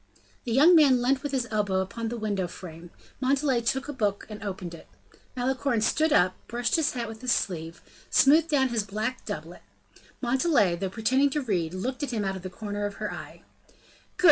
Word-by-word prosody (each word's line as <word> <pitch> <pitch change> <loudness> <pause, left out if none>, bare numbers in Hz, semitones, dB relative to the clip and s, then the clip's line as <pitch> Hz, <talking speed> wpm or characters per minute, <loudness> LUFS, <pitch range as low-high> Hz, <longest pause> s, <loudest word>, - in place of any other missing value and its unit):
The 240 - -3
young 300 +9 +7
man 280 -6 +6
leant 260 +2 +1
with 290 - -4
his 255 -4 -1
elbow 205 -3 +1
upon 225 +5 -3
the 240 - -4
window 205 -4 -1
frame; 170 -1 -10 0.3
Montalais 270 -1 +1
took 265 +4 -1
a 295 - -4
book 205 -6 -1
and 210 -1 -8
opened 185 -4 -5
it. 165 - -12 0.5
Malicorne 255 -1 0
stood 310 +8 +2
up, 180 -7 +4
brushed 240 +1 0
his 320 -3 +1
hat 240 -2 -3
with 220 0 -9
his 255 -1 0
sleeve, 165 -6 -2 0.3
smoothed 310 +4 +5
down 270 -3 +3
his 235 -2 0
black 215 +5 -4
doublet; 175 -4 -6 0.6
Montalais, 245 - +2
though 190 +2 -3
pretending 260 +7 +2
to 295 +2 -1
read, 180 -7 -1
looked 250 +9 -3
at 290 - -2
him 220 -5 -2
out 195 0 -1
of 190 - -7
the 185 - -6
corner 205 +1 -4
of 200 - -8
her - - -4
eye. - - -10 0.7
"Good!" - - -35
230 Hz, 200 wpm, -27 LUFS, 195-265 Hz, 0.7 s, young